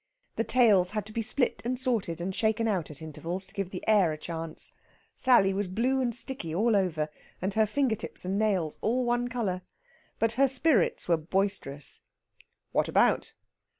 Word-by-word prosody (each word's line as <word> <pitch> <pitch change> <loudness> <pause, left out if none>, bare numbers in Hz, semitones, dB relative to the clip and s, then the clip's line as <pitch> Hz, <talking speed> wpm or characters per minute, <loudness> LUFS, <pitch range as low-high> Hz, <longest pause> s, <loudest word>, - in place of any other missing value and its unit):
The 225 - 0
tails 215 -8 +4
had 210 - -1
to 215 - -8
be 230 - -1
split 245 +3 +2
and 250 +2 -1
sorted 230 - -1
and 185 +2 -3
shaken 220 +3 +1
out 190 -7 -1
at 150 +1 -9
intervals 170 +4 -5
to - - -11
give 195 -2 -3
the 185 - -7
air 205 -6 +5
a 155 - -4
chance. 165 0 -6 0.4
Sally 240 -7 +4
was 200 0 -1
blue 245 +8 +1
and 240 -3 -1
sticky 235 - -5
all 220 +4 +3
over, 170 -6 +1 0.3
and 190 +2 -2
her 220 0 +3
finger 255 0 +1
tips 195 - -5
and 195 +2 -1
nails 190 -8 0
all 250 +3 +1
one 240 0 +1
colour. 215 -7 -2 0.6
But 225 0 +2
her 275 +4 +3
spirits 265 - +1
were 170 -2 +3
boisterous. 160 -4 -2 0.7
"What - - +1
about?" - - +2
205 Hz, 185 wpm, -28 LUFS, 180-240 Hz, 0.7 s, air